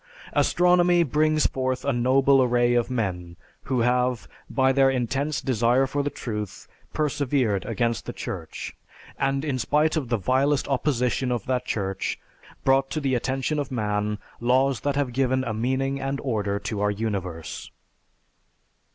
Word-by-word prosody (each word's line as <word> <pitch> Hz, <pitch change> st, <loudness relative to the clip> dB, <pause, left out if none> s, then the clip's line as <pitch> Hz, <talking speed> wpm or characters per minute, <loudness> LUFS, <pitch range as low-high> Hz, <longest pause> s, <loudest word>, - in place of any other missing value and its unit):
Astronomy 175 Hz, -1 st, +4 dB
brings 155 Hz, +1 st, +2 dB
forth 130 Hz, 0 st, -1 dB
a 140 Hz, -, +1 dB
noble 130 Hz, +3 st, +4 dB
array 120 Hz, -1 st, +3 dB
of 120 Hz, 0 st, +1 dB
men 90 Hz, -8 st, -3 dB, 0.3 s
who 125 Hz, -2 st, 0 dB
have, 125 Hz, 0 st, +1 dB, 0.2 s
by 130 Hz, -1 st, +3 dB
their 135 Hz, 0 st, +4 dB
intense 135 Hz, +3 st, -1 dB
desire 125 Hz, +1 st, +2 dB
for 145 Hz, +2 st, -1 dB
the 145 Hz, -, -1 dB
truth, 105 Hz, -7 st, -6 dB, 0.2 s
persevered 135 Hz, -, 0 dB
against 120 Hz, -1 st, -1 dB
the -, -, -2 dB
Church, -, -, -6 dB, 0.4 s
and 135 Hz, +1 st, 0 dB
in 135 Hz, -4 st, -1 dB
spite 150 Hz, +7 st, +2 dB
of 140 Hz, -7 st, -2 dB
the 120 Hz, -, +2 dB
vilest 135 Hz, +7 st, +1 dB
opposition 130 Hz, -2 st, 0 dB
of 120 Hz, -5 st, -2 dB
that 125 Hz, -1 st, -1 dB
Church, 95 Hz, -2 st, -2 dB, 0.4 s
brought 135 Hz, 0 st, +3 dB
to 155 Hz, -, -2 dB
the 135 Hz, -3 st, 0 dB
attention 135 Hz, +4 st, -1 dB
of 145 Hz, -, -3 dB
man 105 Hz, -3 st, -1 dB, 0.2 s
laws 130 Hz, +1 st, +2 dB
that 140 Hz, +5 st, -1 dB
have 140 Hz, -4 st, -1 dB
given 130 Hz, 0 st, +1 dB
a 115 Hz, -, -3 dB
meaning 130 Hz, +4 st, -1 dB
and 135 Hz, +1 st, -2 dB
order 105 Hz, -6 st, -1 dB
to 100 Hz, 0 st, -4 dB
our 105 Hz, -, +2 dB
universe. 100 Hz, -6 st, -4 dB
130 Hz, 150 wpm, -25 LUFS, 115-140 Hz, 0.4 s, Astronomy